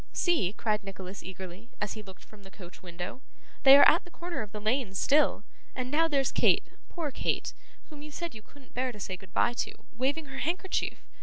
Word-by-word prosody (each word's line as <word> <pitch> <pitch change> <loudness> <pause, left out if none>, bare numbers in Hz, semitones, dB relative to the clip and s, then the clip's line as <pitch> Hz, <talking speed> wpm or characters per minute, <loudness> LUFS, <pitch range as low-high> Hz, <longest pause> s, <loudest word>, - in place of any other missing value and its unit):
'See,' 325 - +2
cried 215 -1 0
Nicholas 195 0 -7
eagerly, 190 +4 -9
as 210 -1 -2
he 215 - -7
looked 190 -2 -13
from 215 -1 -16
the 195 - -13
coach 185 -2 -13
window, 175 +7 -7 0.4
'they 275 0 +10
are - - +9
at 335 - +5
the - - -14
corner 345 -5 -5
of 210 -2 -7
the 210 - -5
lane 215 -1 0
still! 285 +3 +3 0.3
And 255 0 -3
now 325 +2 +4
there's 275 -4 +1
Kate, - - +4 0.3
poor 320 -5 -3
Kate, - - -1 0.4
whom 295 -1 -10
you 300 - -8
said 340 +1 -5
you 220 - -10
couldn't 270 +4 -19
bear 255 +1 -1
to 210 - -12
say 190 -1 -4
goodbye 190 +6 0
to, - - -2 0.2
waving 275 +6 0
her 270 -1 -7
handkerchief. 360 +4 -1
240 Hz, 210 wpm, -30 LUFS, 195-290 Hz, 0.4 s, they